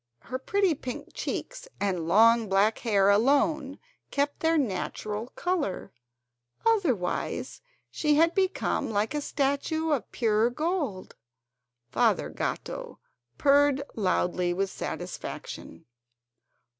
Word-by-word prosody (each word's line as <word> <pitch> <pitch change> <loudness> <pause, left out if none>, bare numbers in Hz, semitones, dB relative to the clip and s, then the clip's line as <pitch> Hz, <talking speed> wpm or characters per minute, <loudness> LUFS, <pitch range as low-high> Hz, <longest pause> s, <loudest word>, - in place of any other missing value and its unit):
Her 255 +1 -5
pretty 390 +5 +2
pink 260 -4 -6
cheeks - - -5
and 180 -5 -1
long 225 +4 +5
black 200 +3 +3
hair 200 -4 +3
alone 275 +5 +2 0.3
kept 285 +1 -1
their 325 0 +2
natural 215 -2 -2
colour, 335 - -2 0.7
otherwise 315 - 0 0.3
she 300 -1 +2
had 330 +3 +4
become 380 0 0
like 215 +2 0
a 295 - -1
statue 290 +3 -1
of 285 -5 -1
pure 225 -1 +2
gold. 295 - -3 0.8
Father - - +2
Gatto - - -4 0.4
purred 285 -1 +4
loudly 180 -3 0
with 195 +1 -1
satisfaction. 80 - -6
260 Hz, 105 wpm, -27 LUFS, 205-310 Hz, 0.8 s, long